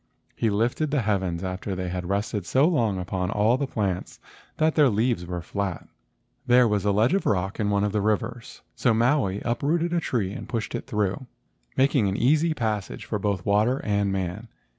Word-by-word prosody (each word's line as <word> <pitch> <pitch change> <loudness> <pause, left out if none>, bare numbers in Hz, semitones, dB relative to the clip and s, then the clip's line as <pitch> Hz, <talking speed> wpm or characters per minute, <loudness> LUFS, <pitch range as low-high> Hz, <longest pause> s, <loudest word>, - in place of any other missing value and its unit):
He 115 - +1
lifted 115 +9 0
the 140 -4 0
heavens 95 -4 -1
after 95 +1 -4
they 90 -1 -3
had 90 0 -4
rested 100 -1 -2
so 135 +4 +4
long 115 - +1
upon 90 0 -2
all 110 +3 +3
the 140 +1 -2
plants 100 -7 -3 0.4
that 155 0 +2
their 150 -4 +5
leaves 110 -4 0
were 90 -1 -4
flat. 100 -3 -4 0.6
There 125 0 +6
was 105 -2 0
a 105 - +3
ledge 110 - +3
of 195 - +1
rock 95 +2 0
in 105 -2 +1
one 100 0 +1
of 105 - 0
the 105 0 0
rivers, 110 +3 -2
so 120 -3 +2
Maui 115 -5 +2
uprooted 160 +8 0
a 175 - +2
tree 110 - -1
and - - -8
pushed 115 -3 -3
it - - -4
through, 105 +2 -1 0.5
making 135 -5 +3
an 95 - -2
easy 155 +6 +3
passage 105 -3 -3
for 110 -2 -2
both 100 -3 -1
water 105 +6 +3
and 100 -1 +1
man. 95 +4 -3
105 Hz, 195 wpm, -25 LUFS, 95-125 Hz, 0.6 s, There